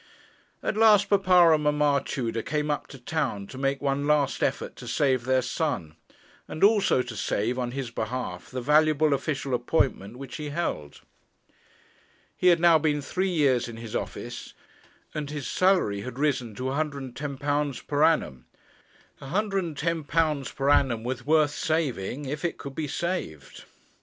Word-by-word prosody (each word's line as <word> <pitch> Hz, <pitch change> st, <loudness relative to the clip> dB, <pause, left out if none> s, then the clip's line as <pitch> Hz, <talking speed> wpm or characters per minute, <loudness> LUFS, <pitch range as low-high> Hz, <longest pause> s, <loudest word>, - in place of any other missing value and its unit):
At -, -, -1 dB
last 210 Hz, -3 st, +5 dB
papa 180 Hz, -4 st, +6 dB
and 150 Hz, -1 st, +1 dB
mamma 150 Hz, -1 st, +2 dB
Tudor 115 Hz, -3 st, -3 dB
came 150 Hz, +4 st, -1 dB
up 145 Hz, -, -3 dB
to 135 Hz, -, -11 dB
town 130 Hz, -6 st, -2 dB
to 130 Hz, -, -11 dB
make 135 Hz, +1 st, -1 dB
one 140 Hz, +1 st, 0 dB
last 150 Hz, -2 st, +2 dB
effort -, -, -1 dB
to 125 Hz, -, -9 dB
save 130 Hz, -1 st, +1 dB
their 130 Hz, 0 st, +2 dB
son; 125 Hz, -, -2 dB, 0.5 s
and 155 Hz, -, -4 dB
also 200 Hz, -, +4 dB
to 120 Hz, -2 st, -8 dB
save, 110 Hz, +4 st, -1 dB
on 125 Hz, -1 st, -1 dB
his 130 Hz, -1 st, -5 dB
behalf, 110 Hz, -5 st, -4 dB
the 130 Hz, -, -4 dB
valuable 155 Hz, +2 st, +3 dB
official 140 Hz, -1 st, -2 dB
appointment 120 Hz, -4 st, 0 dB
which 135 Hz, 0 st, -8 dB
he 150 Hz, -2 st, -5 dB
held. 145 Hz, -, -4 dB, 1.3 s
He 180 Hz, -, +1 dB
had 175 Hz, -2 st, +6 dB
now 165 Hz, -2 st, +6 dB
been 150 Hz, -1 st, +1 dB
three 185 Hz, +7 st, -1 dB
years 140 Hz, -9 st, +2 dB
in 115 Hz, -1 st, -8 dB
his 115 Hz, -1 st, -7 dB
office, -, -, -6 dB, 0.6 s
and 150 Hz, -2 st, -4 dB
his 145 Hz, -3 st, -5 dB
salary 185 Hz, -, +2 dB
had 125 Hz, +4 st, -7 dB
risen 130 Hz, -7 st, -1 dB
to 130 Hz, -, -6 dB
£110 140 Hz, 0 st, -2 dB
per 145 Hz, +1 st, +1 dB
annum. 65 Hz, -, +1 dB, 0.8 s
£110 165 Hz, -4 st, -1 dB
per 135 Hz, +1 st, 0 dB
annum 120 Hz, -6 st, +2 dB
was 125 Hz, +3 st, -4 dB
worth 155 Hz, -1 st, +4 dB
saving 145 Hz, -5 st, -2 dB
if 145 Hz, +3 st, -4 dB
it 170 Hz, -, -1 dB
could 140 Hz, -, -8 dB
be 155 Hz, +1 st, -3 dB
saved. 135 Hz, -, -4 dB
145 Hz, 155 wpm, -26 LUFS, 125-155 Hz, 1.3 s, papa